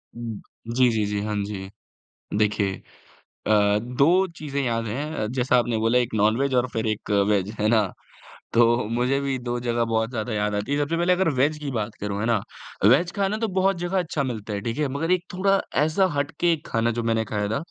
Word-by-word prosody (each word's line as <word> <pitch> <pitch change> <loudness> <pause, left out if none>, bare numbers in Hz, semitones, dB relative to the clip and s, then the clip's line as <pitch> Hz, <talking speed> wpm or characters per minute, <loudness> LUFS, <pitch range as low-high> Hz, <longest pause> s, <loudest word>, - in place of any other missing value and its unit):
उम, 115 -3 -6 0.3
जी, 125 -1 +5
जी, 110 -2 0
जी, 105 0 -2
हाँ 105 0 -2
जी। 95 -2 -6 0.7
देखिए 105 -2 0 0.6
अ, 105 -1 +4
2 140 - +3
चीज़ें 145 -3 -3
याद 115 -3 -1
हैं। 140 +2 -3
जैसा 125 -1 +2
आपने 120 -1 0
बोला 115 +3 +3
एक 120 -1 -1
नॉन-वेज 110 +6 +2
और 125 0 +3
फिर 110 0 -2
एक 110 0 -3 0.2
वेज 100 -2 +1
है 105 - +2
ना? 110 -1 +5 0.7
तो 120 - +6 0.3
मुझे 125 +4 +1
भी 135 -1 -1
2 120 0 -3
जगह 120 -1 0
बहुत 110 0 0
ज़्यादा 120 -2 -3
याद 105 0 0
आती 105 +6 -3
हैं। 145 - +1
सबसे 145 +3 0
पहले 175 +2 +3
अगर 185 -1 +2
वेज 150 +3 +2
की 145 -2 -4
बात 110 0 -3
करूँ 100 0 -3
है 105 - -1
ना? 115 -2 +2 0.5
वेज 145 - +5
खाना 200 +1 0
तो 225 0 -1
बहुत 190 0 +2
जगह 175 +2 -1
अच्छा 160 -4 -2
मिलता 110 -5 -4
है 100 - -3
ठीक 115 +3 -3
है? 150 -1 +1
मगर 140 +6 -2
एक 180 -1 +2
थोड़ा 195 +2 +2 0.2
ऐसा 160 +5 +2
हट 140 +2 -1
के 175 - +3
एक 160 -1 -6
खाना 115 +1 +1
जो - - -1
मैंने 115 -1 +1
खाया 105 -1 -2
था 110 - 0
120 Hz, 215 wpm, -24 LUFS, 110-150 Hz, 0.7 s, तो